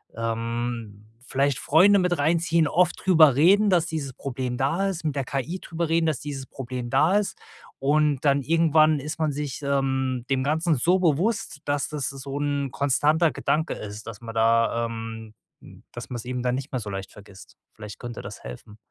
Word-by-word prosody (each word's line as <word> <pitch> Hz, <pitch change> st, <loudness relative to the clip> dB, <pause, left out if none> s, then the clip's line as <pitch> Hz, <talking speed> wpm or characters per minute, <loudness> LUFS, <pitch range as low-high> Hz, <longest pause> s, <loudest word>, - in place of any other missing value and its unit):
Ähm, 115 Hz, -2 st, -4 dB, 0.2 s
vielleicht 135 Hz, 0 st, 0 dB
Freunde 195 Hz, +6 st, +5 dB
mit 180 Hz, -1 st, +1 dB
reinziehen, 165 Hz, +1 st, +2 dB
oft 175 Hz, +3 st, +1 dB
drüber 160 Hz, -7 st, +6 dB
reden, 195 Hz, +8 st, +5 dB
dass 175 Hz, -3 st, +3 dB
dieses 155 Hz, -5 st, -4 dB
Problem 125 Hz, -1 st, -4 dB
da 165 Hz, +9 st, 0 dB
ist, 175 Hz, -4 st, -5 dB
mit 150 Hz, -3 st, -2 dB
der 135 Hz, -2 st, -2 dB
KI 140 Hz, +8 st, -3 dB
drüber 170 Hz, 0 st, -3 dB
reden, 165 Hz, 0 st, +2 dB
dass 155 Hz, -6 st, 0 dB
dieses 140 Hz, -2 st, -6 dB
Problem 125 Hz, -2 st, -6 dB
da 170 Hz, -, +3 dB
ist. 205 Hz, -, -4 dB, 0.4 s
Und 145 Hz, 0 st, +1 dB
dann 140 Hz, 0 st, +3 dB
irgendwann 155 Hz, 0 st, +3 dB
ist 150 Hz, +3 st, -6 dB
man 155 Hz, -2 st, +1 dB
sich, 145 Hz, 0 st, -5 dB
ähm, 130 Hz, -3 st, -1 dB
dem 135 Hz, -1 st, +1 dB
Ganzen 160 Hz, +3 st, +1 dB
so 175 Hz, +8 st, +3 dB
bewusst, 180 Hz, +3 st, 0 dB
dass 145 Hz, -1 st, 0 dB
das 145 Hz, -4 st, -3 dB
so 135 Hz, +1 st, -6 dB
'n 140 Hz, -2 st, -1 dB
konstanter 150 Hz, +5 st, +2 dB
Gedanke 160 Hz, +3 st, -1 dB
ist, 105 Hz, +1 st, -8 dB
dass 115 Hz, -1 st, -8 dB
man 115 Hz, -1 st, -8 dB
da, 115 Hz, +1 st, +2 dB
ähm, 115 Hz, -1 st, -7 dB, 0.6 s
dass -, -, -8 dB
man 125 Hz, -, -4 dB
's 120 Hz, -, -8 dB
eben 125 Hz, 0 st, -3 dB
dann 125 Hz, 0 st, +1 dB
nicht 135 Hz, +2 st, -6 dB
mehr 130 Hz, -, -2 dB
so 105 Hz, -3 st, -6 dB
leicht 95 Hz, -1 st, -6 dB
vergisst. 100 Hz, -1 st, -15 dB, 0.2 s
Vielleicht 105 Hz, -1 st, -10 dB
könnte 120 Hz, -2 st, -7 dB
das -, -, -9 dB
helfen. 60 Hz, -, -10 dB
140 Hz, 185 wpm, -25 LUFS, 120-160 Hz, 0.6 s, drüber